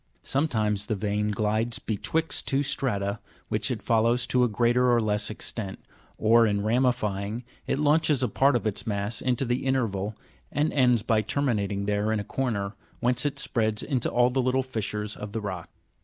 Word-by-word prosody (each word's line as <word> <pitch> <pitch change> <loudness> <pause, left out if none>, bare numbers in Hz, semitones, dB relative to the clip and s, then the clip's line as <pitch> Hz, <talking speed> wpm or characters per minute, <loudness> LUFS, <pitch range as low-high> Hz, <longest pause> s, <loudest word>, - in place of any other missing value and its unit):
Sometimes 110 -8 0
the 110 - 0
vein 105 +1 -1
glides 110 +2 0
betwixt 145 +8 -1
two 140 +1 +2
strata, 105 -8 -1 0.3
which - - 0
it - - -3
follows 115 +2 +2
to 125 -1 +2
a - - +4
greater 120 +3 +3
or 120 - +4
less 105 -1 0
extent; 105 -2 -5 0.4
or, 115 +1 +5
in 100 -1 0
ramifying, 110 -2 0 0.2
it - - 0
launches 150 -2 +3
a - - +3
part 135 +5 +3
of 120 - 0
its 105 0 -2
mass 105 +1 -2
into 130 +1 0
the 120 +1 -1
interval, 110 -6 0 0.4
and 150 +3 0
ends 125 -5 +3
by 110 -2 +2
terminating 105 -5 -1
there 105 +1 0
in 110 - +1
a - - -3
corner, 105 -4 -2 0.3
whence 125 +3 +1
it 145 -1 -4
spreads 110 -5 -1
into 130 -5 0
all 120 +1 +3
the 130 +1 +1
little 130 +1 +1
fissures 105 -4 -3
of 105 -1 -7
the 115 - -1
rock. 95 -5 -5
115 Hz, 180 wpm, -27 LUFS, 105-130 Hz, 0.4 s, or